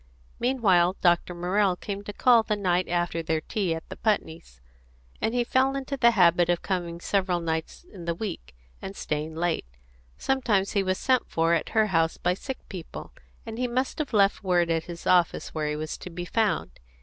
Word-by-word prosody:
Meanwhile 195 -8 +3
Dr. 175 0 +2
Morrell 185 +2 +1
came 200 +2 -6
to 205 - -5
call 235 +3 +5
the 215 -1 -1
night 185 -3 +1
after 175 -1 0
their 160 -1 0
tea 185 -1 -2
at 160 - -8
the - - -6
Putneys', 160 - -2 0.6
and 225 - 0
he 245 - +2
fell 265 +3 +2
into 275 0 -3
the 235 -3 +5
habit 175 -5 +4
of 175 -1 +1
coming 175 -3 -2
several 185 -1 0
nights 160 - -3
in 175 -3 -9
the 170 0 -1
week, 170 - -6 0.3
and 195 - -7
staying 155 -1 -3
late. 165 - -1 0.5
Sometimes 225 -8 +1
he 200 - +2
was 185 -1 0
sent 255 -2 +1
for 165 +1 +2
at 165 - 0
her 220 - +6
house 165 0 +2
by 180 - +1
sick 265 +8 -7
people, 180 -5 -8 0.3
and 225 0 -6
he 250 - +1
must 255 +5 -2
have 305 - -2
left 200 -3 +3
word 175 -3 +2
at 165 -1 0
his 170 -1 -9
office 175 -2 +2
where 155 -1 -1
he 150 - -2
was 155 0 -5
to - - -8
be 175 +1 -6
found. 195 - -1
180 Hz, 195 wpm, -26 LUFS, 170-215 Hz, 0.6 s, her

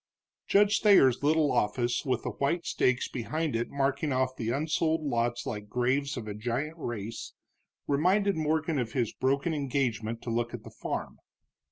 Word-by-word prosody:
Judge 205 +1 +4
Thayer's 135 - +5
little 150 0 +3
office, 120 +3 +1
with 130 -2 0
the - - -2
white 165 +5 -1
stakes 130 0 +1
behind 150 +4 -2
it 115 +1 -1
marking 140 +2 0
off 130 0 0
the 115 -3 -3
unsold 155 +4 0
lots 120 -3 -1
like 105 -1 -5
graves 130 +5 0
of 115 -3 -6
a 105 - -4
giant 125 +10 -3
race, 115 -4 -5 0.5
reminded 190 +8 +2
Morgan 155 -1 0
of 120 -3 -3
his 120 -5 0
broken 140 +5 0
engagement 120 -6 -1
to 120 - -3
look 120 +1 -1
at 110 - -10
the - - -11
farm. - - -5
135 Hz, 165 wpm, -29 LUFS, 120-155 Hz, 0.5 s, Thayer's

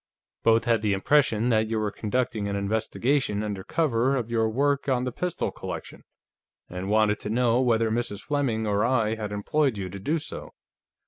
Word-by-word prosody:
Both 115 0 +4
had 115 -2 +2
the 105 -2 +1
impression 115 +1 +2
that 110 -2 +2
you 110 0 -1
were 105 -1 -1
conducting 110 -1 -2
an 100 - -2
investigation 110 +3 0
under 100 -3 -4
cover 135 - +1
of 120 -3 -3
your 110 -1 +2
work 140 +4 0
on 125 -2 +1
the 125 - -2
pistol 180 +7 -2
collection, - - -8 0.6
and 90 +2 -5
wanted 105 0 +3
to - - -5
know 120 +1 +2
whether 115 -3 +2
Mrs. 110 -3 -2
Fleming 130 -7 -1
or 105 0 +1
I 115 -3 +2
had 110 -2 -5
employed 125 +5 0
you 95 -2 -4
to 100 +2 -8
do 150 - 0
so." 155 - -7
115 Hz, 185 wpm, -26 LUFS, 105-130 Hz, 0.6 s, Both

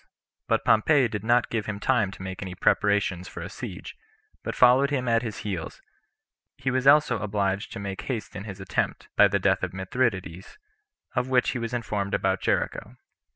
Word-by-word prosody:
But - - +1
Pompey 130 +4 +4
did 105 -3 -5
not 120 +1 +2
give 110 -3 -2
him 105 -2 -4
time 110 -3 +2
to 95 - -10
make 95 -1 -6
any 95 -2 -6
preparations 95 -2 +1
[for 85 - -8
a 90 +4 -7
siege], 100 -3 -8 0.5
but - - -4
followed 130 +3 +5
him 130 -3 -1
at 115 -1 +3
his 110 -4 -6
heels; 95 -6 -4 0.8
he 130 - -1
was 130 +1 0
also 140 -6 +5
obliged 100 -1 -1
to - - -6
make 100 -1 -5
haste 120 -5 -5
in 100 - -6
his 100 -2 -8
attempt, 95 -1 -2
by - - +7
the - - +1
death - - +2
of - - -3
Mithridates, 95 -3 -2 0.6
of 125 +1 0
which 125 -1 +3
he 125 - -3
was 115 0 -4
informed 105 -4 -2
about 95 -1 0
Jericho. - - -1
105 Hz, 190 wpm, -26 LUFS, 95-125 Hz, 0.8 s, by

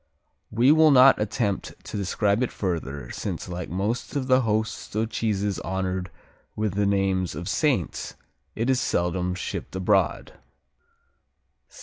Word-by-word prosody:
We 120 +5 +4
will 160 0 +6
not 135 -4 +7
attempt 105 -1 -1
to - - -7
describe 100 +2 0
it 125 - 0
further, 75 - -4
since - - -4
like 90 -1 -5
most 100 - -2
of 140 -2 -1
the 130 0 +4
host 110 -2 -2
of 110 +1 -1
cheeses 105 -3 -1
honored 95 -1 -3 0.5
with 105 -3 -1
the 100 0 +1
names 95 -4 0
of 85 +3 -6
Saints, 125 - -1 0.4
it 115 +2 -1
is 130 -1 +3
seldom 90 +1 0
shipped 90 - -5
abroad. 95 +1 +1
100 Hz, 135 wpm, -25 LUFS, 95-115 Hz, 0.5 s, not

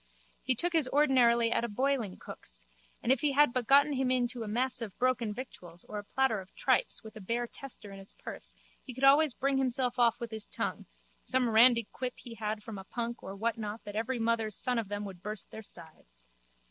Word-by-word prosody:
He 260 - 0
took 345 +8 +1
his 320 -5 +3
ordinary 245 -5 +4
at - - +1
a 235 - -1
boilingcook's 215 - -3 0.4
and 240 - +2
if 265 - +3
he 290 -2 +2
had 290 -2 +5
but 250 -3 0
gotten 285 +2 +6
into 255 -2 0
him 215 - -5
a - - -4
mess 250 +2 +2
of 215 -4 -6
broken 250 -3 +1
victuals 180 -8 -9
or 210 - -5
a - - -7
platter 225 -2 +1
of 185 - -17
tripes - - +1
with 220 0 -11
a 215 - -9
bare 235 +5 -1
tester 235 -4 -9
in 195 - -9
his 195 - -13
purse - - -9 0.3
he 255 - -9
could 260 - -6
always 280 0 +6
bring 275 0 +1
himself 250 -1 0
off 235 -2 +4
with 235 -1 -5
his 220 -1 -3
tongue, - - -4 0.4
some 255 -2 +1
randy 235 0 +6
quip 250 -1 -4
he 240 - -10
had 215 -1 -4
from 215 -3 -7
a - - -8
punk 235 +3 -4
or 195 - -7
whatnot 220 0 -3
that 205 -1 -8
every 230 +4 -1
mother's 225 -2 0
son 250 -2 +1
of 225 - -3
them 205 +1 -4
would 190 -3 -9
burst 210 0 -6
their 220 - -7
sides. 155 - -11
235 Hz, 220 wpm, -31 LUFS, 210-255 Hz, 0.4 s, gotten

